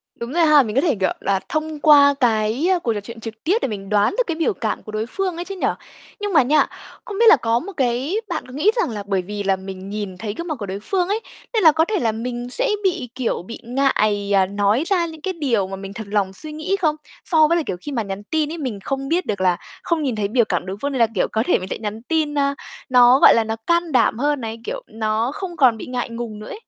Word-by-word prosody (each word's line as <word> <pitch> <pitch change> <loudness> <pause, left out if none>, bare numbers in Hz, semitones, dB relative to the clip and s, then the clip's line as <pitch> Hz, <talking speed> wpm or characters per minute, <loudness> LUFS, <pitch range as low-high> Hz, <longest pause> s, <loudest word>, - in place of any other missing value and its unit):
Đúng 235 +4 -6
rồi 335 -1 +4
ha. 300 -3 +6
Mình 215 0 -5
có 270 - +4
thể, 305 -9 +2
kiểu 190 - +2
là, 195 -1 +1
thông 310 -1 -2
qua 285 -2 +7
cái, 225 +5 +1
ơ, 355 - +1
cuộc 230 -8 -1
trò 205 - -3
chuyện 230 +3 -10
trực 225 0 -8
tiếp 375 +8 +2
để - - 0
mình 195 -3 -6
đoán 210 - +2
được - - +3
cái 335 - -1
biểu 335 +6 +1
cảm 220 - -3
của 215 - -9
đối 215 +1 -2
phương 370 +6 -2
ấy 345 +1 -5
chứ 390 +2 -6
nhỉ. - - 0 0.5
Nhưng 410 -2 -3
mà 290 -5 +6
nha, 300 +4 +3 0.4
không 410 -4 -6
biết 470 - +5
là - - +9
có 230 -2 0
một 395 +8 -7
cái 260 - 0
bạn - - -3
có 255 - -12
nghĩ 360 +10 +3
rằng 460 - +1
là 210 -3 -5
bởi 195 -2 +1
vì 205 +2 -5
là 195 -1 +2
mình 190 0 -8
nhìn 205 -3 -5
thấy 205 0 -4
gương 340 +1 -5
mặt 310 - -2
của 205 - -4
đối 195 +1 -5
phương 360 - -1
ấy, 415 +3 0 0.3
nên 435 -4 +2
là 315 - +9
có 320 +2 +2
thể 415 -2 -1
là 225 -2 +1
mình 240 +2 -5
sẽ - - 0
bị, 350 -10 0
kiểu, 250 -8 -1
bị 230 +5 -8
ngại, 215 -6 +1
ờ, 190 -1 +4
nói 205 +7 +1
ra 360 -4 +2
những 320 -2 -9
cái 375 +3 -2
điều 240 - 0
mà 195 - -5
mình 195 +1 -8
thật 220 -2 -7
lòng 200 -2 0
suy 305 +9 -9
nghĩ 310 +6 -1
không? 305 -2 +2 0.3
So 315 -3 +4
với 340 +2 +2
là, 325 - 0
kiểu, 180 - -3
khi 290 - -6
mà 235 -5 -1
nhắn 195 +1 -6
tin 310 +5 -1
ấy, 335 - -5
mình 250 -9 -4
không 275 0 -3
biết 355 +3 +1
được 200 -2 -3
là 180 -2 +3 0.3
không 330 -3 0
nhìn 255 -5 -1
thấy 205 -2 -1
biểu 235 +1 +2
cảm 180 -3 -2
đối 190 +1 -5
phương, 285 0 -1
nên 260 - -2
là, 230 - +5
kiểu, - - +2
có 220 +1 +1
thể - - +3
mình 185 +1 -7
sẽ - - -3
nhắn 215 +1 -5
tin, 310 0 0
a, 280 0 +1 0.3
nó, 250 +1 +6
gọi - - +8
là, 230 - +3
nó 220 0 -3
can 340 -1 +2
đảm 245 -3 +2
hơn 290 -1 0
này, 225 0 -5
kiểu, - - -5
nó 220 +3 -1
không 355 -1 -6
còn 245 -5 +5
bị - - -7
ngại 250 -1 -3
ngùng 230 -2 -6
nữa 215 - -9
ấy? 430 - -7
245 Hz, 290 wpm, -21 LUFS, 210-315 Hz, 0.5 s, là